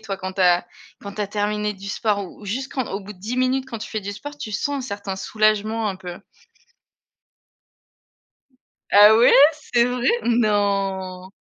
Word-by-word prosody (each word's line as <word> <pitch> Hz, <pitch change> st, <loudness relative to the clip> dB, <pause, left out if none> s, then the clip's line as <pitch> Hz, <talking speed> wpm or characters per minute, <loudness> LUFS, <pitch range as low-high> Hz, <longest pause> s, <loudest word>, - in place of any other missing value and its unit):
toi 205 Hz, -3 st, -5 dB
quand 190 Hz, 0 st, -6 dB
tu 190 Hz, -, -5 dB
as 175 Hz, -1 st, +4 dB, 0.4 s
quand 200 Hz, -, -7 dB
tu 210 Hz, -, -7 dB
as 205 Hz, -, 0 dB
terminé 210 Hz, +1 st, -2 dB
du 195 Hz, +1 st, -11 dB
sport 205 Hz, -2 st, -1 dB
ou 205 Hz, -, -13 dB
juste 260 Hz, +7 st, -4 dB
quand 260 Hz, -3 st, -3 dB
au 195 Hz, -, -4 dB
bout 200 Hz, +1 st, -10 dB
de 190 Hz, -, -20 dB
10 220 Hz, +7 st, -5 dB
minutes 255 Hz, +1 st, 0 dB
quand 235 Hz, -, -5 dB
tu 215 Hz, -, -8 dB
fais 215 Hz, -, -3 dB
du 200 Hz, 0 st, -5 dB
sport, 290 Hz, +8 st, -9 dB
tu 215 Hz, -, -6 dB
sens 285 Hz, +7 st, -2 dB
un -, -, -9 dB
certain 200 Hz, -1 st, -5 dB
soulagement 215 Hz, +2 st, 0 dB
un 190 Hz, -, -7 dB
peu? 180 Hz, -2 st, -8 dB, 2.7 s
Ah 205 Hz, +1 st, +8 dB
ouais 235 Hz, +2 st, +6 dB, 0.2 s
c'est 245 Hz, -5 st, 0 dB
vrai? 250 Hz, +1 st, -1 dB, 0.2 s
Non! 200 Hz, -5 st, 0 dB
210 Hz, 185 wpm, -22 LUFS, 195-230 Hz, 2.7 s, Ah